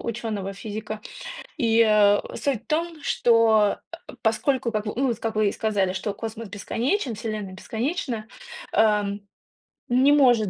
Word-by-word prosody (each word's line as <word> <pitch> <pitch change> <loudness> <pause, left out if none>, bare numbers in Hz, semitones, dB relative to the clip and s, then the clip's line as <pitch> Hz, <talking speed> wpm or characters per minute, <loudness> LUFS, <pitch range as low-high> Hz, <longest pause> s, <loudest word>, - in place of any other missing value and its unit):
ученого-физика. 215 -1 -4 0.6
И, 230 -1 +3
э, 205 -1 +5 0.2
суть 260 -5 -1
в - - -42
том, 325 +1 -1
что, 225 -5 +4
э, 335 +1 -11
поскольку, 240 +2 +1
как 215 0 -2
в 210 - -3
ну 270 +1 +2
вот 235 -1 -2
как 225 -1 -3
вы 215 -1 +3
и - - -1
сказали, 200 -4 0
что 190 +2 -3
космос 225 +1 -6
бесконечен, 240 - -1
вселенная 215 -3 -4
бесконечна, 230 - -3 0.5
эм, 205 -2 +2 0.6
не 260 +4 +4
может 245 -8 +5
220 Hz, 145 wpm, -25 LUFS, 210-245 Hz, 0.6 s, э